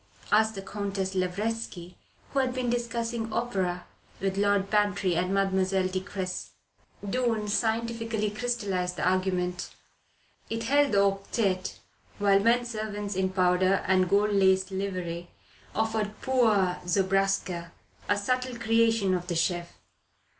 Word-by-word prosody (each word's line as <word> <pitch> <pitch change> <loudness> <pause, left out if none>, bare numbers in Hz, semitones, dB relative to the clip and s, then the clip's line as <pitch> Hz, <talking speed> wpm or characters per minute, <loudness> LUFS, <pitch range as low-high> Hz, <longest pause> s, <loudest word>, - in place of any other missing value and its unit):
asked 220 +1 +4
the 195 - -6
Countess 195 -1 -3
Lavretsky, 185 -1 -3 0.4
who 275 - +2
had 260 -1 0
been 250 -2 0
discussing 235 -1 -2
opera 190 -7 -1 0.3
with 195 0 -1
Lord 200 -1 +2
Bantry 205 -4 +2
and 180 +2 0
Mademoiselle 190 -1 +1
de 185 0 -1
Cressy. 190 -1 -5 0.6
Doon 225 -1 0
scientifically 225 0 0
crystallized 205 -6 -2
the - - 0
argument. 180 -1 -1 0.7
It 225 0 -2
held 285 +2 +3
the 200 0 +5
octette, 195 -1 0 0.4
while 200 -1 +4
men 235 +4 +3
servants 210 -3 -4
in 190 0 +1
powder 185 0 +2
and 185 -1 +3
gold 205 +1 +3
laced 190 -1 +3
livery 180 -3 -4 0.5
offered 220 -1 -1
poires 215 -9 +3
Zobraska, 190 -2 +1 0.4
a 205 - +3
subtle 255 +4 -1
creation 225 -3 +2
of 180 -1 -2
the 175 - -2
chef. 175 +1 -1
200 Hz, 125 wpm, -28 LUFS, 185-225 Hz, 0.7 s, the